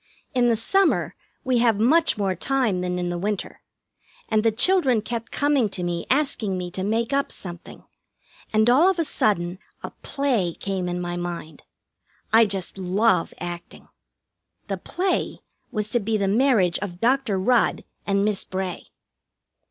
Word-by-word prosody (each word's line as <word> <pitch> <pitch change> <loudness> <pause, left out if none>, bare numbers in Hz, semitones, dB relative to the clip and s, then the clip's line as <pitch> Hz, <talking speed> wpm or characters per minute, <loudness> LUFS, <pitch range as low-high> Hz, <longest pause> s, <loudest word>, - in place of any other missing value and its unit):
In 245 -2 +3
the 230 - +3
summer 385 - +1 0.3
we 255 -2 +1
have 230 -3 +3
much 310 +8 +3
more 195 -2 0
time 225 - 0
than 180 0 -2
in 175 0 -2
the 175 0 -3
winter, 205 +1 -3 0.7
and 215 - +3
the 225 +1 +3
children 260 - +4
kept 230 0 -5
coming 285 -6 +2
to 185 -2 -4
me 175 -1 -3
asking 260 -9 +1
me 180 -1 -5
to 185 +1 -4
make 225 +5 0
up 280 0 0
something, 175 -2 -10 0.7
and 220 +1 +3
all 280 +10 +6
of 380 - 0
a 330 - +1
sudden 185 -8 0 0.2
a - - -5
play 245 - 0
came 190 -2 -3
in 175 0 -3
my 175 0 -3
mind. 175 -2 -6 0.7
I 225 0 +7
just 195 -1 -4
love 190 +1 +2
acting. 175 -1 -8 0.8
The - - -1
play 370 +1 -2 0.3
was 215 -3 -2
to 240 - +2
be 220 0 -1
the 200 -1 0
marriage 210 -5 +3
of 175 -4 -6
Dr. 250 -3 +1
Rudd 235 +6 +2 0.2
and 200 0 +2
Miss 210 -2 +1
Bray. 185 -1 -5
210 Hz, 160 wpm, -24 LUFS, 180-250 Hz, 0.8 s, I